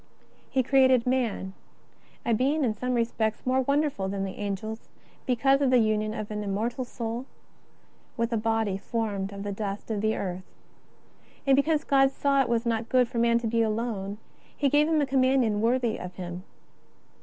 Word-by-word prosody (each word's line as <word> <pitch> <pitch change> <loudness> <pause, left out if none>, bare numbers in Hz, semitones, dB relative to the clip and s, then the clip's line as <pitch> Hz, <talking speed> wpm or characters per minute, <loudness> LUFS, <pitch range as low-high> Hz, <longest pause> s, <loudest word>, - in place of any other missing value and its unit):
He 260 -1 +1
created 260 -2 +4
man, 240 -7 -1 0.7
a 235 - +2
being 280 +7 +1
in 230 -4 +1
some 250 +4 -2
respects 225 -2 -1
more 260 +1 +2
won 280 +3 +2
derful 235 -11 -2
than 195 0 -2
the 190 -1 -5
Angels, 210 +2 -4 0.4
because 270 +2 +3
of 275 - +3
the 255 - +5
union 215 -2 +1
of 215 -1 -5
an 210 0 -3
im 200 -1 -2
mortal 235 +5 -2
spirit 235 +1 -5 0.9
with 230 0 0
a - - +2
body 220 -3 0
formed 205 -3 -3
of 200 0 -7
the 205 - -3
dust 200 +1 -4
of 210 -2 -1
the 220 +1 +1
earth. 185 -1 -5 0.9
And 275 -1 +5
because 305 +2 +2
God 270 -1 +4
saw 275 0 +2
it 260 - -1
was 235 0 +1
not 230 0 -1
good 255 -1 +4
for 235 - -3
man 235 0 +4
to 235 - -2
be 230 +1 +1
alone. 215 -3 -2 0.4
He 285 - +2
gave 295 +2 +4
him 320 -2 +2
a - - +2
companion 260 -5 +2
worthy 235 0 +1
of 180 0 -7
him. 180 0 -7
230 Hz, 190 wpm, -27 LUFS, 210-260 Hz, 0.9 s, the